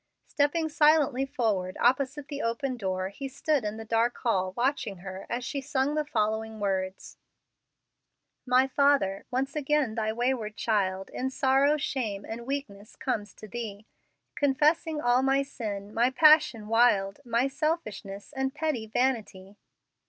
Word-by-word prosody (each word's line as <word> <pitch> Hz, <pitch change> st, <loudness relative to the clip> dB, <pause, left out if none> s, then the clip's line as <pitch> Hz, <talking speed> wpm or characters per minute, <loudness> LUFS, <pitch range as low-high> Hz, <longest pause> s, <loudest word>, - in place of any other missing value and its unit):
Stepping 310 Hz, +3 st, +1 dB
silently 295 Hz, -3 st, +3 dB
forward 215 Hz, -9 st, -1 dB
opposite 275 Hz, +3 st, +1 dB
the 285 Hz, +1 st, -5 dB
open 250 Hz, +3 st, -1 dB
door, 190 Hz, -4 st, -2 dB
he 270 Hz, +8 st, -6 dB
stood 275 Hz, 0 st, 0 dB
in 210 Hz, +1 st, -3 dB
the 225 Hz, -, -7 dB
dark 230 Hz, +2 st, +1 dB
hall 190 Hz, -6 st, 0 dB
watching 240 Hz, -6 st, 0 dB
her 190 Hz, +1 st, -8 dB
as 245 Hz, +1 st, -3 dB
she 280 Hz, 0 st, -3 dB
sung 275 Hz, 0 st, 0 dB
the 305 Hz, 0 st, 0 dB
following 220 Hz, -4 st, -2 dB
words: 190 Hz, -2 st, -3 dB, 1.3 s
"My 255 Hz, +1 st, +4 dB
Father, 270 Hz, -8 st, +2 dB
once 270 Hz, +3 st, -2 dB
again 295 Hz, -5 st, +1 dB
Thy 220 Hz, -1 st, -1 dB
wayward 235 Hz, -2 st, -1 dB
child 195 Hz, -4 st, -1 dB
In 260 Hz, -, -2 dB
sorrow, 270 Hz, +2 st, +3 dB
shame, 225 Hz, -8 st, -3 dB
and 235 Hz, +2 st, -7 dB
weakness 270 Hz, -8 st, -5 dB
comes 210 Hz, -1 st, -3 dB
to 215 Hz, -, -11 dB
Thee, 215 Hz, -2 st, -6 dB, 0.5 s
Confessing 300 Hz, +3 st, +2 dB
all 245 Hz, -2 st, +3 dB
my 270 Hz, +1 st, +2 dB
sin, 210 Hz, -6 st, -6 dB
my 240 Hz, +2 st, +3 dB
passion 270 Hz, -6 st, +5 dB
wild, 210 Hz, -4 st, +3 dB
My 240 Hz, +1 st, +1 dB
selfishness 265 Hz, -, -3 dB
and 265 Hz, 0 st, -2 dB
petty 300 Hz, -8 st, -2 dB
vanity. 215 Hz, -5 st, -1 dB
245 Hz, 145 wpm, -28 LUFS, 210-275 Hz, 1.3 s, passion